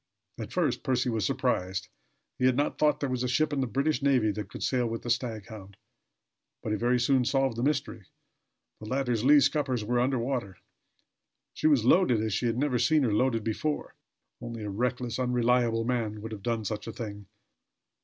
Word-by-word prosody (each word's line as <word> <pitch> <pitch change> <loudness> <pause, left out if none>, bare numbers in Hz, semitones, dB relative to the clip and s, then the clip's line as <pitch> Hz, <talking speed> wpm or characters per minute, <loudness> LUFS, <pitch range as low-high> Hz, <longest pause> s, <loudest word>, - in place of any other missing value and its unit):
At - - -6
first - - 0
Percy 125 -1 0
was 110 -4 0
surprised. 95 0 -1 0.5
He 125 - +2
had 130 - +3
not 145 - 0
thought 150 -1 +3
there 140 - 0
was 125 -1 -2
a 125 - 0
ship 150 +4 +1
in 140 - 0
the 130 - 0
British 140 +7 0
navy 130 -6 +3
that 105 -1 -6
could - - -7
sail 125 -2 +1
with 115 0 -4
the 120 - -5
Staghound; 110 -5 -4 0.9
but 110 - -3
he - - +1
very 120 +3 +1
soon 130 +1 +3
solved 135 0 +1
the 120 - -3
mystery. 135 -7 -1 0.7
The 105 - -9
latter's 125 -3 -1
lee 145 +3 +7
scuppers 130 -7 0
were 120 +2 +1
under 130 +2 +1
water. 120 -6 -3 1.0
She - - 0
was 140 -7 +3
loaded 130 - +4
as 110 -2 -1
he 120 - 0
had 115 0 -1
never 130 -2 +1
seen 145 +5 +3
her 115 -5 +1
loaded 115 0 +1
before. 145 +8 -2 0.5
Only 115 -2 -6
a 105 - -4
reckless, 125 +3 -2
unreliable 125 -2 +2
man 115 -4 -1
could 110 +2 -7
have 105 -2 -7
done 115 +1 -2
such 105 +1 -4
a - - -4
thing. 105 -4 -7
120 Hz, 195 wpm, -28 LUFS, 110-130 Hz, 1.0 s, lee